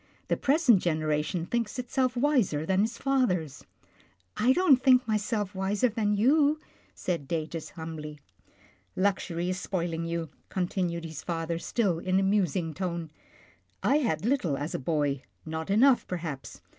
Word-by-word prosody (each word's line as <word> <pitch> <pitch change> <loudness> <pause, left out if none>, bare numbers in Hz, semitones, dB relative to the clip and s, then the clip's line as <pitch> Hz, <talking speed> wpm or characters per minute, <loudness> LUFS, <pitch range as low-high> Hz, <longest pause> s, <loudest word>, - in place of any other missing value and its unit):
The - - +3
pres 300 +3 +1
ent 225 -6 +7
generation 155 0 0
thinks 230 +2 -2
itself 255 0 0
wiser 240 - +2
than 190 +3 +2
its 230 +1 -6
fathers." 180 - 0 0.7
I 245 +4 +3
don't 290 -5 +5
think 255 -1 +5
myself 210 -1 -1
wiser 200 +5 +1
than 210 -1 0
you," 290 +7 +3 0.4
said 170 -7 -3
Datus 160 0 -3
humbly. 155 -2 -6 0.4
" 90 -1 -32
Luxury 180 -3 0
is 185 - -3
spoiling 170 -4 -2
you," 165 -1 -3 0.2
continued 175 -2 -2
his 160 -2 -7
father, 165 -1 -3
still 190 -4 0
in 185 +2 +1
a - - +1
musing 185 -4 +1
tone. 170 -2 -4 0.7
I 285 - +4
had 210 - 0
little 230 - +1
as 145 +4 -4
a - - -2
boy, 145 -1 0 0.2
not 160 +1 -4
enough, 245 +6 +4
perhaps. 160 -6 -5
185 Hz, 150 wpm, -28 LUFS, 160-235 Hz, 0.7 s, ent